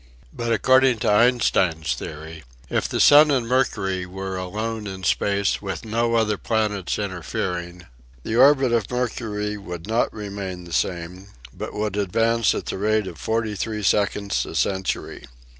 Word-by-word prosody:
But 120 0 -3
according 130 +3 +4
to - - +3
Einstein's 105 -8 +2
theory, 80 +1 -8 0.3
if - - 0
the - - -2
sun 150 +1 +8
and 130 -5 +1
Mercury 95 -8 0
were 95 +1 -5
alone 105 +4 -4
in 95 -1 -7
space 100 +1 +1
with 95 -1 -5
no 115 +1 0
other 105 -3 +1
planets 105 -5 -1
interfering, 90 -2 -4 0.4
the 110 - -3
orbit 135 0 +5
of 115 -4 0
Mercury 105 -4 -2
would 90 -4 -8
not 115 +3 +1
remain 100 -4 -6
the 85 -1 -10
same, 90 +3 -2 0.3
but - - -6
would 105 -1 -2
advance 115 +3 +2
at - - -4
the - - -4
rate 110 +1 +1
of 85 -5 -8
43 110 -1 -2
seconds 100 0 +1
a - - -7
century. 95 -1 -2
105 Hz, 150 wpm, -23 LUFS, 95-115 Hz, 0.4 s, sun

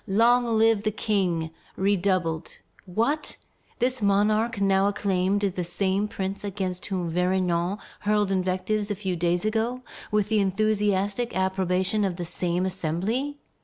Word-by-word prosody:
Long 235 +5 +4
live 225 -2 +3
the 215 - 0
King!" 185 -6 0 0.3
redoubled. 185 -4 0 0.3
What! 230 - -1 0.4
this 255 0 0
monarch 210 +3 +2
now 195 0 +3
acclaimed 200 0 0
is 195 -2 +1
the 180 - -2
same 190 +3 0
prince 195 -1 -4
against 190 -3 -3
whom 180 -4 -2
Vergniaud 180 +1 +1 0.2
hurled 210 -1 +1
invectives 190 +3 0
a 205 - -1
few 190 -2 -2
days 175 +2 0
ago 230 +4 -1 0.3
with 210 -1 +1
the 220 -1 +3
enthusiastic 205 +2 +1
approbation 190 +2 +1
of 190 -3 0
the 175 0 -4
same 175 +1 -1
Assembly! 190 - -2
195 Hz, 135 wpm, -26 LUFS, 185-215 Hz, 0.4 s, Long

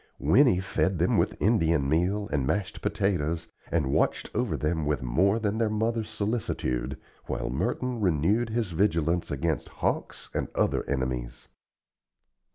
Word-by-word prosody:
Winnie 90 - +4
fed 95 0 0
them 85 +3 +2
with - - +1
Indian 85 -9 +2
meal 90 +7 +1
and 70 -3 +1
mashed 95 +3 -2
potatoes 85 -5 -1 0.2
and 75 -5 +1
watched - - +1
over 105 -9 0
them 80 +2 -1
with 75 -2 -1
more 95 - +2
than 110 -1 -1
their 115 -2 +2
mother's 110 +1 -1
solicitude, 105 - -2 0.3
while - - -2
Merton 120 - -1
renewed 100 +6 +2
his 110 -4 -1
vigilance 85 -2 +1
against 80 +1 -1
hawks - - -3
and - - -1
other - - +1
enemies. 65 -2 -3
90 Hz, 140 wpm, -27 LUFS, 75-105 Hz, 0.3 s, Winnie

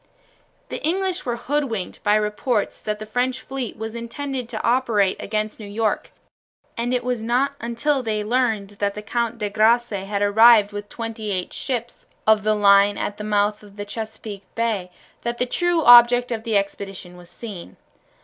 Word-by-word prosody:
The - - -5
English 370 0 -1
were 240 - 0
hoodwinked 240 -6 -3
by 205 0 +3
reports 210 +2 -1
that 210 0 -3
the 215 - -7
French 250 +4 -1
fleet 265 -3 -5
was 220 +1 -6
intended 250 +1 -5
to 220 -3 -5
operate 230 -6 +2
against 215 +1 -3
New 210 - -8
York, 215 +1 -1 0.7
and 235 +1 -2
it 250 -1 0
was 245 -2 -2
not 245 +5 +1
until 250 +5 0
they 215 -3 -2
learned 220 -3 0
that 200 -1 0
the 210 - -7
Count 235 +2 -2
de 210 -2 -2
Grasse 225 +3 +3
had 200 0 -2
arrived 215 0 +6
with 205 0 -7
twenty 225 -2 -5
eight 185 -3 -2
ships 240 -3 -4 0.2
of 220 -1 +5
the 215 +1 +2
line 200 0 +5
at 205 - -3
the 210 - -6
mouth 210 0 +1
of 205 -1 -16
the 205 0 -6
Chesapeake 220 -1 -7
Bay 220 -6 -1 0.3
that 235 0 -3
the 250 - +1
true 345 +5 +1
object 245 0 +7
of 225 0 -3
the 220 -3 +2
expedition 195 -2 -4
was 175 -1 -14
seen. 205 -7 -9
220 Hz, 180 wpm, -22 LUFS, 205-245 Hz, 0.7 s, object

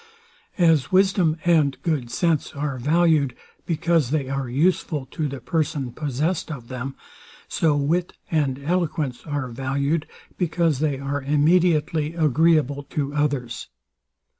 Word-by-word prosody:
As 165 -7 +3
wisdom 185 -4 +3
and 155 -5 +3
good 150 -8 -1
sense 160 +4 0
are 140 -2 -3
valued, 150 -2 +2 0.3
because 165 -4 +1
they 140 -3 -1
are 135 -2 -2
useful 150 0 +1
to 155 -3 -2
the 140 -1 -6
person 145 -2 -1
possessed 150 +6 -2
of 125 -6 -8
them; 130 +1 -5 0.5
so 155 -3 +1
wit 165 +5 0 0.2
and 145 -5 +1
eloquence 155 -5 -1
are 145 -3 -2
valued, 140 +5 -1 0.3
because 165 -4 +1
they 150 -2 0
are 140 +1 -3
immediately 155 +1 +2
agreeable 155 -2 +3
to 145 0 -3
others. 140 -5 -1
150 Hz, 125 wpm, -23 LUFS, 135-165 Hz, 0.5 s, As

